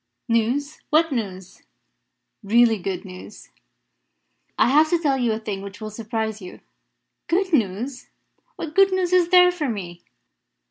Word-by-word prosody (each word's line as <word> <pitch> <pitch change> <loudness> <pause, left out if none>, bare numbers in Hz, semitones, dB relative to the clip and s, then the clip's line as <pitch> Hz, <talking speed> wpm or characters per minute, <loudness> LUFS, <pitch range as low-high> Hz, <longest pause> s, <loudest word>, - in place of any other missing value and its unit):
"News? 245 +6 0
What 320 +1 +3
news?" 190 -7 -5 0.8
"Really 225 +1 +3
good 190 +2 -4
news. 185 +2 -12 1.1
I - - +4
have 305 +3 +4
to 345 - +2
tell 295 -5 +1
you 240 -2 +1
a 215 - -1
thing 210 -3 -5
which 200 +1 -9
will 215 -1 -7
surprise 220 0 -4
you." 180 - -10 0.7
"Good 370 +1 0
news? 240 +2 -1 0.5
What 320 -2 -7
good 390 0 +5
news 365 -1 0
is 355 -2 +4
there 360 -1 +6
for 315 -6 -3
me?" 175 -6 -6
235 Hz, 145 wpm, -22 LUFS, 205-315 Hz, 1.1 s, there